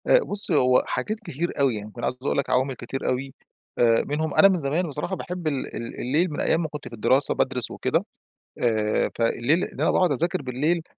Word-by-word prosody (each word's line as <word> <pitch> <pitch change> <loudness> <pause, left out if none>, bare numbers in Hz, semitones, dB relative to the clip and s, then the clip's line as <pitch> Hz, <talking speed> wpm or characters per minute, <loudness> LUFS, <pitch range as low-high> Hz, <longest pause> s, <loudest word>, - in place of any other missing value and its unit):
آآ، - - +6
بُص 205 -2 +2
هو 130 -5 +4
حاجات 215 +1 -2
كتير 170 - -4
أوي 135 -4 +3
يعني، 105 0 -7
كنت 120 - -9
عايز - - 0
أقول - - 0
لك 140 - -1
عوامل 130 +2 +1
كتير 125 +3 -4
أوي 130 +1 -2 0.5
آآ، 115 -1 +4
منهم 155 +1 -1
أنا 195 - +7
من 190 -3 +1
زمان 155 +5 -1
بصراحة 150 +6 -3
باحب 180 -2 -5
ال 140 -4 -3
ال 115 - -6
الليل 155 +8 +1
من 145 - -5
أيّام 165 - +2
ما - - -1
كنت 150 -1 -8
في - - -11
الدراسة 130 +5 +2
بادرس 125 -4 -1
وكده - - 0 0.5
آآ، 110 -3 +1
فالليل 120 +8 +2
اللي - - -6
أنا - - +3
باقعد 180 -4 +3
أذاكر 155 +2 -1
بالليل 145 +7 0
140 Hz, 215 wpm, -24 LUFS, 125-170 Hz, 0.5 s, أنا